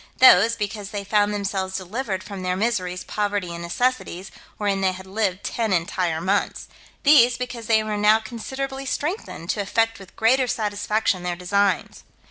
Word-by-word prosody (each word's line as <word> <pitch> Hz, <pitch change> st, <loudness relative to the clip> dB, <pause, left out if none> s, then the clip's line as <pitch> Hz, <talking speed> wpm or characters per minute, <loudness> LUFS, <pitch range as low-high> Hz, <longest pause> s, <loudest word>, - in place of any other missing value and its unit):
Those, 230 Hz, -3 st, +7 dB
because 205 Hz, -2 st, -4 dB
they 205 Hz, -1 st, -4 dB
found 205 Hz, +1 st, +2 dB
themselves 195 Hz, -2 st, -2 dB
delivered 195 Hz, +1 st, -4 dB
from 200 Hz, -2 st, -7 dB
their 180 Hz, 0 st, -1 dB
miseries, 185 Hz, -4 st, -1 dB
poverty, 205 Hz, -4 st, -2 dB
and 170 Hz, -, -6 dB
necessities, 190 Hz, -1 st, -2 dB, 0.3 s
wherein 200 Hz, -2 st, 0 dB
they 190 Hz, -1 st, +2 dB
had 185 Hz, +1 st, -10 dB
lived 195 Hz, -1 st, -1 dB
ten 225 Hz, -3 st, -1 dB
entire 170 Hz, -1 st, 0 dB
months. 190 Hz, +4 st, -1 dB, 0.4 s
These, 250 Hz, -5 st, +6 dB
because 245 Hz, -3 st, -5 dB
they 220 Hz, -1 st, +4 dB
were 215 Hz, -1 st, -2 dB
now 210 Hz, +1 st, +5 dB
considerably 265 Hz, +4 st, -5 dB
strengthened, 295 Hz, -, -3 dB
to 205 Hz, -, -2 dB
effect 225 Hz, +3 st, 0 dB
with 190 Hz, -2 st, -14 dB
greater 255 Hz, +3 st, +3 dB
satisfaction 210 Hz, -3 st, 0 dB
their 175 Hz, 0 st, -2 dB
designs. 200 Hz, +3 st, 0 dB
205 Hz, 160 wpm, -23 LUFS, 190-230 Hz, 0.4 s, Those